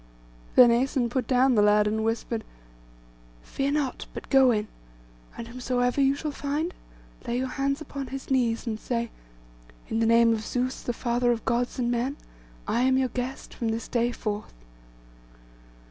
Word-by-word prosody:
Then 245 -2 +8
Æson 245 0 +1
put 250 -2 -1
down 260 0 +4
the 215 - +4
lad, 210 0 +5
and 220 +1 0
whispered— 225 0 -2 1.0
'Fear 275 +1 -2
not, 290 -4 -2
but - - -8
go 270 -2 +6
in, 215 -2 +1 0.7
and 230 - -6
whomsoever 245 +2 0
you 275 0 +4
shall 300 +1 -4
find, 290 +5 -2 0.5
lay 235 +1 0
your 260 - 0
hands 275 +2 -1
upon 280 -3 -6
his 270 +1 -7
knees, 240 -3 +1
and 220 -2 -3
say, 235 -1 -2 0.8
"In 225 - 0
the 225 - +2
name 230 0 +5
of 220 - -2
Zeus, 250 +3 -2
the - - -2
father 240 0 0
of 230 -2 -2
Gods 240 +3 0
and 240 -1 0
men, 250 +4 -1 0.5
I 235 - +1
am 260 +1 +3
your 260 -1 +1
guest 250 +2 -5
from 230 -3 -2
this 225 +1 -3
day 240 0 +1
forth." 210 - -5
245 Hz, 170 wpm, -26 LUFS, 230-265 Hz, 1.0 s, Then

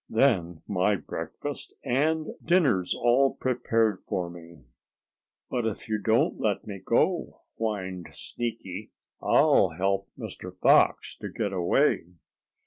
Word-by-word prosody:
"Then 95 - +2
my 100 +1 +2
breakfast - - -6
and 155 +5 +1
dinner's 135 - +2
all 125 +3 +3
prepared 115 -5 +1
for 85 -2 -3
me." 85 -3 -13 0.8
"But 120 -2 -1
if 110 - -5
you 110 -1 -1
don't 110 +2 +2
let 105 -2 0
me 100 -2 -6
go," 170 - +1 0.2
whined 95 -5 -3
Sneaky, 110 -4 -5 0.3
"I'll 95 - +4
help 95 +1 0
Mr. - - -7
Fox - - +4
to - - -6
get 100 -3 -3
away." 90 -2 +2
105 Hz, 120 wpm, -27 LUFS, 95-120 Hz, 0.8 s, I'll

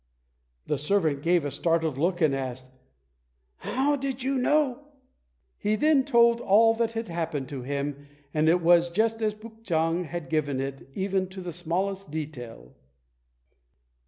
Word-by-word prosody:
The 150 - -1
servant 155 -3 +1
gave 170 -1 +2
a 145 - -2
startled 165 -3 0
look, 175 +3 0
and 155 -3 +4
asked, 130 -1 -5 0.9
"How 275 +3 0
do 275 0 -3
you 270 +1 -1
know?" 290 0 +1 0.8
He 210 +1 +1
then 285 +3 +3
told 235 -3 +4
all 225 +3 +5
that 230 0 -1
had 225 0 -3
happened 165 -5 -3
to 140 -3 -5
him, 140 +2 -4 0.3
and 155 +1 +3
it 175 +2 +3
was 175 0 +5
just 225 +5 0
as 215 -1 0
Puk 220 +1 -14
chang 165 -1 0
had 170 -2 -6
given 145 -3 -1
it 135 0 -5
even 190 -1 0
to 190 +1 -8
the 175 -2 -6
smallest 185 +3 -2
detail. 125 - -7
175 Hz, 155 wpm, -27 LUFS, 150-225 Hz, 0.9 s, all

